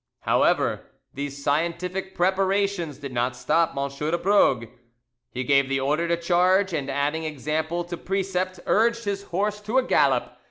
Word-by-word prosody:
However, - - +1 0.3
these 140 0 -6
scientific 170 +6 -1
preparations 190 -3 0
did 140 -2 -8
not 125 +1 0
stop 160 +5 +1
M. 140 0 0
de 155 +4 -1
Brogue: 175 - +3 0.6
he 130 - -4
gave 140 +1 +3
the 135 0 +1
order 150 +5 0
to 170 0 +1
charge, 180 +3 +2
and 140 -4 -2
adding 145 +3 -1
example 155 +3 -2
to 175 0 -6
precept, 185 0 -2
urged 235 +2 +2
his 200 -1 -2
horse 205 +4 -2
to 215 +5 -1
a 260 - +4
gallop. - - +1
170 Hz, 155 wpm, -24 LUFS, 145-190 Hz, 0.6 s, a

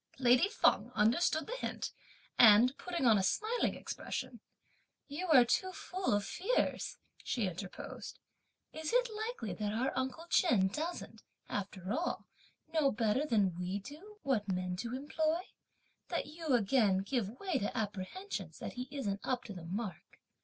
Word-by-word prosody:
Lady 255 +7 +5
Feng 440 - +3
understood 310 +9 +3
the - - -4
hint, - - -3 0.5
and 235 +3 +8
putting 345 -6 -2
on 220 -4 +6
a - - +1
smiling 440 - +1
expression, - - -5 0.7
"You 310 +6 -4
are 265 -7 +7
too 370 +10 +1
full 370 +1 -2
of 205 -1 0
fears!" 400 - -1 0.3
she 235 -5 0
interposed. 185 +1 -6 0.6
"Is 315 0 -3
it - - +3
likely 435 - -3
that 205 +3 -2
our 240 +5 0
uncle 260 +5 -2
Chen 215 - +4
doesn't, 320 - -5 0.3
after 195 -1 -3
all, 335 +7 -2 0.5
know 300 -4 +3
better 225 +6 +1
than 205 -8 +3
we 180 +3 -3
do 305 - -10
what 230 -7 +1
men 180 0 -1
to 235 +5 -3
employ, 310 +4 0 0.7
that - - -1
you 315 -4 -1
again 205 -4 +3
give 230 +1 -2
way 380 -2 0
to 205 - -2
apprehensions 205 - -4
that - - -6
he 250 +1 -5
isn't 210 -9 -3
up 255 -1 -1
to 210 - -8
the 175 -3 -8
mark! 195 +2 -5
250 Hz, 155 wpm, -34 LUFS, 200-320 Hz, 0.7 s, and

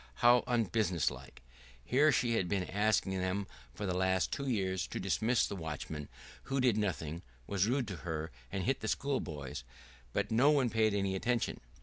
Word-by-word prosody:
How 120 0 +7
unbusiness 110 -7 +1
like! - - -12 0.4
Here 145 +5 +4
she 120 -3 +2
had 95 -6 0
been 100 -2 +1
asking 100 -1 +1
them 95 +2 -1 0.3
for 105 - -4
the 90 - 0
last 95 -5 +1
two 140 -1 -2
years 95 -6 0
to - - -5
dismiss 115 +2 +2
the - - -4
watchman, 75 -3 -5 0.4
who 135 0 -1
did 125 -4 +4
nothing, 85 -6 -2 0.2
was 100 - +1
rude 125 0 +1
to 95 - -5
her, 80 -1 -4 0.2
and 95 - -2
hit 135 +5 +1
the 110 - -4
schoolboys; 80 - -2 0.5
but - - -1
no 125 +6 +5
one 135 -6 +3
paid 110 -1 +2
any 100 -1 0
attention. 120 +4 -1
100 Hz, 180 wpm, -33 LUFS, 90-120 Hz, 0.5 s, How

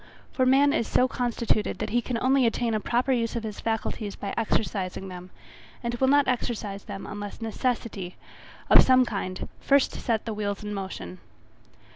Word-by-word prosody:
For 255 -1 +2
man 280 +2 +5
is 235 -8 0
so 255 - +3
constituted 235 -4 0
that 215 0 -3
he 240 +2 +2
can 240 0 -2
only 260 -1 +4
attain 230 0 0
a 215 - +1
proper 245 +5 0
use 235 -3 0
of 230 - -2
his 215 -2 -5
faculties 220 -2 -2
by 200 - -5
exercising 195 -4 -1
them, 180 0 -9 0.5
and 235 0 -1
will 265 +2 +1
not 285 +1 +4
exercise 215 -5 -2
them 195 - -7
unless 205 0 -6
necessity, 225 -5 -2 0.5
of - - +9
some 255 -1 +5
kind, 190 -5 -4
first 280 -1 +3
set 225 -3 -1
the 225 - -3
wheels 205 -1 -3
in 210 0 -4
motion. 100 - -6
225 Hz, 175 wpm, -26 LUFS, 200-250 Hz, 0.5 s, of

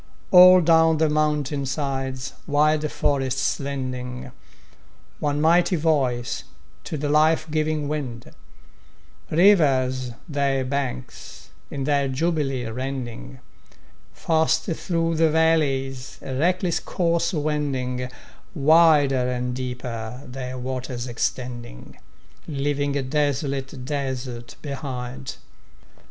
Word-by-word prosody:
All 185 0 +9
down 160 -1 +4
the 160 0 +2
mountain 150 -2 0
sides 135 -1 -3
wild 150 +1 +2
forests 135 -2 0
lending 130 -2 -5 0.9
One 145 -1 0
mighty 170 +4 +4
voice 135 -7 0 0.4
to 155 - -4
the 145 +1 -2
life 155 +2 +3
giving 155 -1 0
wind, 135 -6 -5 1.0
Rivers 135 -9 +3
their 140 -3 0
banks 130 -2 -5 0.2
in 140 - -4
their 140 0 +1
jubilee 135 -2 -1
rending, 120 - -5 0.7
Fast 160 -1 +1
through 165 -1 -1
the 160 0 +4
valleys 140 -5 +1
a 135 - -5
reckless 180 +4 +1
course 170 -1 0
wending, 140 -6 -2 0.5
Wider 145 -4 +4
and 125 0 -2
deeper 125 -1 -5
their 130 0 -6
waters 125 -1 -4
extending, 120 - -4 0.5
Leaving 145 -1 -1
a 140 - -1
desolate 140 -1 -2
desert 130 -4 -4
behind. 130 -3 -5
140 Hz, 95 wpm, -23 LUFS, 130-155 Hz, 1.0 s, All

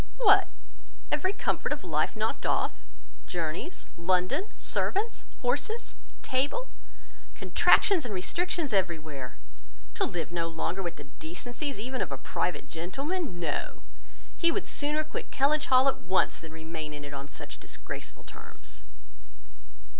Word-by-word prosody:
"What! 415 -5 +7 0.6
every 300 +6 +2
comfort - - 0
of - - -1
life - - +1
knocked - - -1
off! - - +2 0.6
Journeys, 170 - -3
London, 185 - +2
servants, 435 +4 0 0.2
horses, 295 - 0 0.3
table—contractions 340 - +2
and 240 - -4
restrictions 300 - 0
every 180 -4 +3
where! 140 -5 -7 0.6
To - - +1
live 170 -2 -3
no 170 -1 0
longer 165 +3 -1
with 175 -2 -3
the 145 - -8
decencies 180 - -4
even 255 +5 -2
of - - -1
a 135 - -2
private 155 +6 -1
gentleman! 270 - -2
No, 160 -4 -2 0.5
he 335 -1 +4
would 400 - -1
sooner 300 +1 +1
quit 310 - -5
Kellynch 295 +2 +3
Hall 260 +1 +7
at 270 - +3
once, 185 +2 +2
than 160 - -9
remain 160 -1 -5
in 145 0 -7
it 145 - -7
on 140 0 -5
such 135 - -8
disgraceful - - -6
terms." - - -10
195 Hz, 135 wpm, -30 LUFS, -, 0.6 s, What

